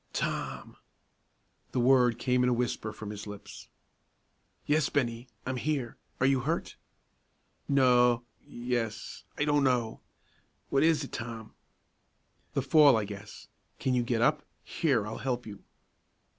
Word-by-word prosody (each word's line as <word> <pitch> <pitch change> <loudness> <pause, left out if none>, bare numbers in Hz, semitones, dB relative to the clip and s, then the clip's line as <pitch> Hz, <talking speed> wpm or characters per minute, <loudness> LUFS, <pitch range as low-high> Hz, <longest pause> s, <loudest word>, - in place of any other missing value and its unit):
"Tom!" - - -3 1.0
The - - +1
word 125 -2 +4
came 125 0 +1
in 125 - +3
a - - +3
whisper 120 -2 -2
from 105 -1 -7
his 105 0 -7
lips. 105 -1 -10 1.0
"Yes, 150 -1 +2
Bennie, 120 -3 -1 0.2
I'm 130 0 -2
here; 130 -2 -2 0.2
are 125 - +3
you 135 -1 +4
hurt?" 155 +7 -2 0.9
"No 125 -3 +4 0.2
yes 120 -2 -4
I 150 - +1
don't 145 -1 +3
know; 125 -4 +1 0.7
what 135 - +3
was 160 -2 +3
it, 135 - -8
Tom?" 115 -1 -6 1.0
"The 135 - +1
fall, 140 -2 +6
I 110 - -1
guess. 100 -1 -10 0.3
Can 130 - 0
you 125 - +3
get 120 -1 0
up? 150 +3 +3 0.2
Here, 135 -10 0
I'll 110 +1 -6
help 125 -2 -2
you." 100 -2 -9
125 Hz, 140 wpm, -29 LUFS, 115-135 Hz, 1.0 s, fall